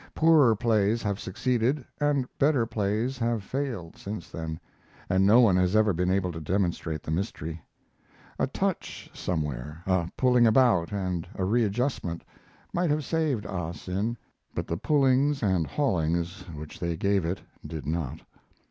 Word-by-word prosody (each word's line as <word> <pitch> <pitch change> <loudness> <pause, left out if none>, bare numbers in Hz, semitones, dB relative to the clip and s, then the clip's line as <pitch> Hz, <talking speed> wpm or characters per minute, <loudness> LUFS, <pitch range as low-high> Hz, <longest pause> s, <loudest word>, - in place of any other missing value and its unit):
Poorer 155 -8 +5
plays 110 0 +2
have 100 -2 -1
succeeded 125 +6 0
and 145 -3 +2
better 140 -4 +3
plays 110 +4 -1
have 115 -3 0
failed 120 -9 -4
since 100 -3 -7
then, 80 -1 -5 0.5
and 95 +1 +4
no 110 +4 +7
one 105 -6 +5
has 90 +2 +2
ever 110 -2 +4
been 90 +2 0
able 95 -1 +1
to 80 -1 -7
demonstrate 85 -2 -1
the - - -4
mystery. 80 -2 -3 0.8
A - - +2
touch - - -3
somewhere, 75 -2 -3
a 95 -3 +1
pulling 125 -2 +5
about 110 -7 +4
and 90 -4 -2
a 95 - -1
readjustment, 110 -4 0 0.5
might 175 -1 +1
have 150 -1 0
saved 150 -9 0
"Ali 85 -3 -3
Sin," 100 +8 -3 0.4
but - - -2
the 85 - -2
pullings 140 - +2
and 95 -6 +2
haulings 85 - -1
which 75 0 -9
they 85 -1 -2
gave 100 +1 +2
it 85 +4 -2 0.2
did 80 -3 -6
not. 80 -1 -3
100 Hz, 150 wpm, -27 LUFS, 85-120 Hz, 0.8 s, no